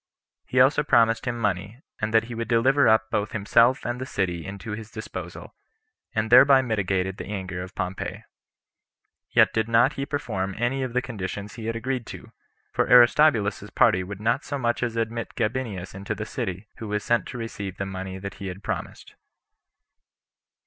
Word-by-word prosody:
He 130 - +1
also 135 +4 +5
promised 115 -6 +3
him 120 -1 -1
money, 105 +1 -2 0.2
and 105 +1 -2
that 110 0 +4
he 120 +2 -8
would 115 0 -4
deliver 130 +4 +4
up 110 0 +3
both 105 0 -1
himself 115 +4 +3
and 120 +1 -3
the - - -3
city 90 -3 -2
into 100 +3 -7
his 105 +1 -6
disposal, 110 -1 -8 0.6
and 110 +1 -1
thereby 135 +2 +8
mitigated 95 -5 -1
the - - -7
anger 95 -3 -4
of 90 +1 -9
Pompey. 90 +1 -4 1.1
Yet - - +4
did 110 0 0
not 120 +5 +4
he 140 0 -4
perform 95 -10 -3
any 120 +4 0
of 130 -2 -3
the 125 0 +1
conditions 105 -3 -5
he 115 -2 -7
had 115 - -2
agreed 125 0 -3
to; - - -10 0.4
for - - +1
Aristobulus's 120 -4 +5
party 90 +1 +3
would 100 +1 -7
not 120 +6 0
so 140 - -4
much 120 -3 -1
as 120 -2 -1
admit 115 0 -3
Gabinius 110 -5 -3
into 100 +1 -4
the - - -5
city, 95 +3 -5
who 110 - -7
was 105 0 -2
sent 120 0 +1
to - - -7
receive 100 -5 -6
the 95 - -3
money 95 0 -6
that 100 +1 -6
he 100 - -4
had 95 +2 -7
promised. - - -5
110 Hz, 185 wpm, -25 LUFS, 100-120 Hz, 1.1 s, thereby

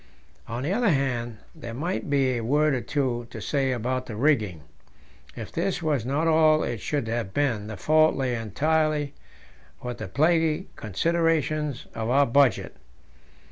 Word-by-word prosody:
On 120 +2 -4
the 160 +7 0
other 235 0 +2
hand, 125 - -1 0.2
there 120 -8 -8
might 170 +5 -3
be 135 -2 +2
a 115 - -3
word 150 +5 +2
or 130 - -1
two 120 -4 -2
to - - -8
say 135 -2 0
about 130 +1 -2
the 110 - -6
rigging; 110 - +1 0.7
if - - -7
this 175 +1 -2
was 145 -7 0
not 150 +5 0
all 155 -1 +4
it 115 -4 -3
should 145 -6 -2
have 115 -4 -3
been, 120 -8 0
the 110 - -6
fault 155 +1 +4
lay 130 -2 -1
entirely 150 +5 0 0.7
with 125 -1 -5
the - - -5
plaguy 160 - +2
considerations 155 - 0
of 110 0 -3
our 140 +3 +4
budget. 130 -3 +2
140 Hz, 160 wpm, -26 LUFS, 120-155 Hz, 0.7 s, all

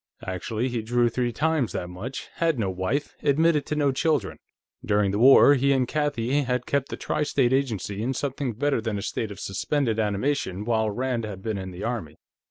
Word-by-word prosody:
Actually, 110 +6 -2
he 120 -3 -2
drew 120 +2 +2
three 120 +1 -1
times 155 -3 0
that 90 - -3
much, 100 +9 -7
had 165 -4 +1
no 100 -5 0
wife, 95 +11 -2
admitted 150 +1 +2
to 150 - -1
no 145 -2 +2
children. 135 -6 0 0.4
During 105 -1 +2
the 100 - -1
war, 135 +3 +8
he 140 0 +2
and 130 -2 +1
Kathie 145 -2 0
had 125 -2 -1
kept 140 -1 -1
the - - -5
Tri 150 - -2
State 135 -4 +2
Agency 110 -7 -1
in 130 +4 -1
something 135 -2 -2
better 140 +2 0
than 110 -2 -2
a 100 - -4
state 110 +1 -3
of 100 -1 -9
suspended 115 +3 -1
animation 105 -1 -1
while 110 -2 +1
Rand 120 +2 -2
had 100 -3 -7
been 110 -3 -2
in 95 0 -6
the 90 +1 -8
Army. 115 -10 -3
120 Hz, 200 wpm, -25 LUFS, 105-140 Hz, 0.4 s, war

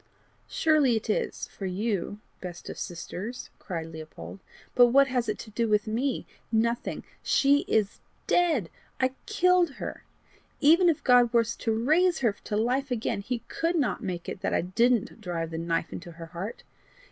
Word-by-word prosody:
"Surely 300 -6 +3
it 220 0 -1
is - - -2
for 195 - -6
you, 205 +1 -2 0.2
best 180 -2 -7
of - - -9
sisters," 190 +7 -6
cried 165 -4 -4
Leopold; 155 - -9 0.3
"but 245 -1 +7
what 275 +3 +6
has 250 -4 -1
it 210 - -1
to 215 - -10
do 230 +2 0
with 210 -1 +2
me? 240 +5 -1 0.3
Nothing. 235 +1 0 0.2
She 280 +1 +4
is 205 -2 +1 0.3
DEAD 315 - +2 0.3
I 260 0 +2 0.2
killed 360 -4 +3
her. - - -6 0.6
Even 340 +5 +6
if 320 - 0
God 245 -2 +5
were 235 -1 +4
to 230 0 -3
raise 345 +4 +4
her 225 -5 +2
to 210 - -1
life 255 +5 +1
again, 230 -4 -1
HE 235 +3 -4
could 335 +2 -1
not 285 -8 0
make 175 -2 -4
it 190 - -5
that - - 0
I - - +2
didn't 230 +5 +1
drive 170 -4 -3
the 160 - -3
knife 165 0 -1
into 175 -1 -8
her 165 0 -9
heart! 180 +6 -7
230 Hz, 170 wpm, -27 LUFS, 185-265 Hz, 0.6 s, but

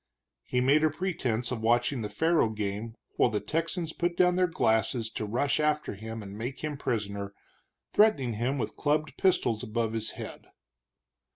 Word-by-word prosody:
He 125 - 0
made 140 +4 +4
a 155 - +5
pretense 140 -9 -2
of 120 -3 -3
watching 120 +3 +2
the 105 - -3
faro 160 +2 +2
game 110 +1 -4 0.2
while - - +5
the 105 -2 -1
Texans 165 - -2
put 175 0 -1
down 180 -1 +4
their 180 0 +3
glasses 115 -6 +1
to 110 - -3
rush 125 +8 +1
after 150 -3 +1
him 110 +2 -7
and 100 0 -8
make 120 +5 -5
him 150 -1 -2
prisoner, 100 -6 -3 0.6
threatening 145 - +4
him 120 +6 -1
with 125 - -3
clubbed 150 -1 0
pistols 120 - +2
above 110 0 -1
his 110 -1 -2
head. - - -8
125 Hz, 170 wpm, -29 LUFS, 110-155 Hz, 0.6 s, a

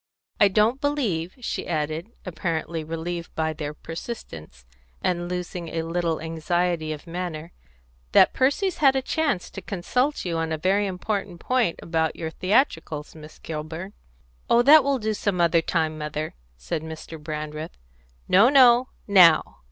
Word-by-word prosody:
"I 205 - +7
don't 215 +7 +2
believe," 215 - -1
she - - -4
added, 155 +4 -2
apparently 165 -2 -3
relieved 165 +2 -5
by 160 0 0
their 150 -1 -5
persistence, 80 - -8 0.4
and 175 -1 -1
losing 180 -1 -4
a 165 0 -2
little 165 -1 -1
anxiety 165 0 -1
of 150 -1 -7
manner, 170 -2 -5 0.6
"that - - +6
Percy's 300 +8 +1
had 270 -3 +4
any 265 - 0
chance 285 - -1
to 195 - -7
consult 250 +11 -1
you 165 -2 -1
on 165 0 -2
a 160 - -1
very 195 +5 +1
important 190 -1 -3
point 250 -7 0
about 160 -1 0
your 160 -1 -5
theatricals, 165 - 0
Miss 155 -1 -13
Kilburn." 160 +5 -6 0.6
"Oh, 235 +1 +5
that 300 +3 +8
will 280 0 +1
do 220 -2 -1
some 200 -3 -1
other 170 -1 +4
time, 160 -2 -1
mother," 150 +1 -4 0.2
said 60 - -4
Mr. 160 0 -8
Brandreth. 155 +1 -6 0.5
"No, 205 +7 +6
no! 255 -2 +6 0.2
Now! 180 -6 +5
170 Hz, 150 wpm, -24 LUFS, 160-205 Hz, 0.6 s, that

